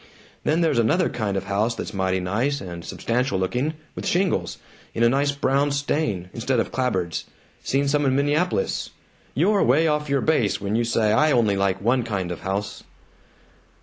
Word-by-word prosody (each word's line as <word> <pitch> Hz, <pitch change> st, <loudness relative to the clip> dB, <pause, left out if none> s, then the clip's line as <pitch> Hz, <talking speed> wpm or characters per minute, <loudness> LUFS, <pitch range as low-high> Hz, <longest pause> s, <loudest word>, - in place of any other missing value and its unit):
Then 160 Hz, +3 st, +1 dB
there's 160 Hz, -8 st, +2 dB
another 145 Hz, +11 st, +2 dB
kind 100 Hz, -4 st, -2 dB
of 95 Hz, -, -2 dB
house 105 Hz, +4 st, 0 dB
that's -, -, -6 dB
mighty 95 Hz, -1 st, 0 dB
nice 115 Hz, +11 st, -1 dB
and 85 Hz, -6 st, -7 dB
substantial 120 Hz, +1 st, -1 dB
looking, 125 Hz, +11 st, -1 dB, 0.2 s
with -, -, -5 dB
shingles, 175 Hz, -, 0 dB, 0.4 s
in 115 Hz, -, +1 dB
a 115 Hz, -, +6 dB
nice 140 Hz, +3 st, +2 dB
brown 140 Hz, 0 st, +1 dB
stain, 140 Hz, -, -1 dB
instead 125 Hz, +2 st, 0 dB
of -, -, -1 dB
clapboards 110 Hz, -9 st, -1 dB, 0.4 s
seen 140 Hz, +1 st, +1 dB
some 145 Hz, 0 st, +2 dB
in 130 Hz, -, +2 dB
Minneapolis. 145 Hz, -, 0 dB, 0.5 s
You're 195 Hz, +8 st, +3 dB
way 140 Hz, +7 st, +4 dB
off 150 Hz, -1 st, 0 dB
your 140 Hz, -1 st, +2 dB
base 110 Hz, -11 st, +1 dB
when 100 Hz, +1 st, -2 dB
you 120 Hz, +1 st, +1 dB
say 115 Hz, -2 st, +1 dB
I 150 Hz, +8 st, +4 dB
only 115 Hz, -6 st, +3 dB
like 95 Hz, -1 st, 0 dB
one 120 Hz, +5 st, +2 dB
kind 100 Hz, -6 st, -3 dB
of 85 Hz, -, -5 dB
house!" 100 Hz, +1 st, -3 dB
120 Hz, 180 wpm, -23 LUFS, 100-145 Hz, 0.5 s, a